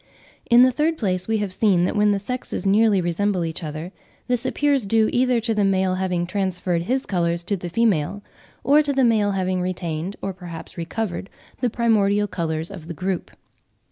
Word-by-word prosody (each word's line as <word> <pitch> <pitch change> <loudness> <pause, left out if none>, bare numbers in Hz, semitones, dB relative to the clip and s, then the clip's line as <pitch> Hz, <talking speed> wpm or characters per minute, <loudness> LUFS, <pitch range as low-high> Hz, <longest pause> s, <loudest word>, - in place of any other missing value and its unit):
In 240 +1 +7
the 255 - +5
third 310 +5 0
place, 185 -6 -1
we 220 0 +1
have 205 -3 -3
seen 185 -4 +3
that - - -2
when 210 0 +3
the 205 - +2
sexes 245 +2 -5
nearly 205 0 +4
resemble 180 +1 0
each 165 +2 -5
other, 155 +3 -5 0.4
this 250 0 0
appears 280 -5 +1
due 220 +1 +3
either 250 -1 +3
to 225 0 -1
the 210 -1 +1
male 190 -1 +2
having 185 -2 -1
transferred 180 -2 -1
his 255 +9 -1
colours 170 -2 0
to 200 +3 +1
the 175 -2 -6
female, 205 -2 0 0.4
or 290 +4 +5
to 290 -1 -1
the 270 -1 +2
male 215 -4 +3
having 185 -1 -1
retained, 180 0 -3
or 195 - -4
perhaps 175 -3 -9
recovered, 190 +2 -4 0.3
the 250 - +1
primordial 210 -3 +2
colours 165 -2 -3
of 170 -5 -9
the 170 - -6
group. 185 +1 -3
195 Hz, 190 wpm, -22 LUFS, 175-225 Hz, 0.4 s, In